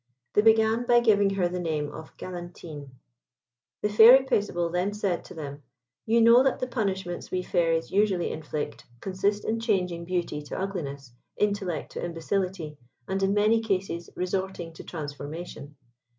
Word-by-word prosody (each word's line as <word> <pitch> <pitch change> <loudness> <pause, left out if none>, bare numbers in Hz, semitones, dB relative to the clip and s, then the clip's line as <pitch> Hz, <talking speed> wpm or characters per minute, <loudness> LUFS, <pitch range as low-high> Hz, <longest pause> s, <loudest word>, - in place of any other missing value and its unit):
They - - +5
began 225 +2 +4
by 240 -1 +6
giving 205 -4 +3
her 180 -2 +2
the 180 +1 -4
name 155 -4 -2
of 160 - -11
Galantine. 175 -5 -8 0.9
The 210 - +2
Fairy 235 +6 +8
Paisible 190 -9 0
then 180 +3 0
said 195 -4 -1
to - - -11
them, 145 -2 -7 0.5
"You 230 +1 +4
know 230 +2 +7
that 270 -1 +2
the - - -2
punishments 190 -8 -3
we 185 0 -1
Fairies 165 -2 +1
usually 195 -3 +2
inflict, 155 -1 -5 0.2
consist 195 +4 -1
in 225 +1 0
changing 180 -7 0
beauty 175 -4 -2
to 145 - -7
ugliness, 140 -10 -5 0.2
intellect 200 -5 -1
to - - -5
imbecility, 170 -2 -3 0.3
and 190 0 -1
in 195 +1 +2
many 215 +2 +4
cases 185 -5 -2
resorting 185 -2 -3
to - - -10
transformation. 145 -1 -7
185 Hz, 150 wpm, -27 LUFS, 165-210 Hz, 0.9 s, Fairy